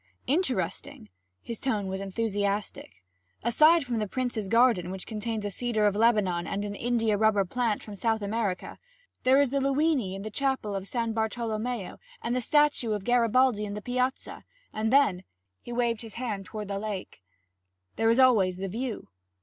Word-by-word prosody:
'Interesting!' 210 - -1 0.3
His 230 -2 -5
tone 215 -7 -1
was 190 0 -4
enthusiastic. 200 - -3 0.4
'Aside 305 +8 +5
from 240 -4 -2
the 210 - -1
prince's 240 -3 -2
garden, 230 -5 +3
which 190 0 -6
contains 220 -1 -4
a 205 - -2
cedar 220 0 0
of 205 -1 +2
Lebanon 205 -6 +2
and 200 +1 -2
an 205 - -4
india 225 -1 0
rubber 210 -2 +3
plant 230 +2 -1
from 210 - -9
South 220 +1 -1
America, 200 -2 -3 0.5
there 260 +2 +6
is 280 -3 +2
the 280 - +1
Luini 275 -7 +1
in 195 - -7
the 215 - -6
chapel 265 -5 -1
of 195 0 -4
San 230 -1 -2
Bartolomeo, 225 -1 -3 0.2
and 240 +1 -2
the 255 - 0
statue 295 -4 +2
of 205 -2 -3
Garibaldi 245 -1 +3
in 205 -1 -4
the 210 - -5
piazza. 255 +1 -2 0.3
And 220 +1 -1
then 260 -10 +3 0.2
' 95 -1 -52
he - - -9
waved 235 -2 0
his 225 -3 -9
hand 220 -6 -4
toward 210 +1 -6
the 200 0 -2
lake, 200 - -6 0.7
'there 225 - +2
is 230 - +3
always 215 -9 +4
the 195 +1 -3
view.' 235 +3 -4
220 Hz, 175 wpm, -28 LUFS, 200-245 Hz, 0.7 s, there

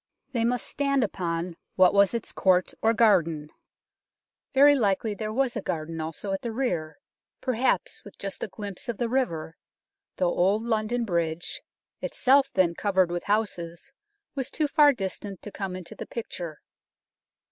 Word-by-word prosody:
They 235 -4 0
must 245 +1 0
stand 275 -2 +1
upon 170 -4 -2 0.2
what 185 0 +6
was 200 +2 +4
its 230 - -3
court 185 -1 +2
or 225 - +4
garden; 170 -10 +3 1.0
very 285 +2 +7
likely 215 -4 +1
there 215 +1 -4
was 255 +1 0
a - - -2
garden 160 0 -3
also 165 +5 -5
at 195 - -2
the 235 - -3
rear, 180 -11 -2 0.4
perhaps 250 -6 0
with 205 - -13
just 195 -1 -5
a - - -1
glimpse 205 +3 -6
of 235 - -2
the 240 - 0
river, 170 -11 -1 0.6
though 180 -2 +1
Old 200 +5 +2
London 230 +1 0
Bridge, 170 -3 -2 0.4
itself 270 +1 +3
then 180 -3 +3
covered 190 -1 +2
with 175 0 -3
houses, 200 -1 -2 0.4
was 265 -2 -3
too 305 - 0
far 295 -1 +6
distant 195 -4 -5
to 210 - -7
come 195 -2 -4
into 185 -2 -8
the - - -8
picture. 175 -9 -6
200 Hz, 160 wpm, -27 LUFS, 175-240 Hz, 1.0 s, very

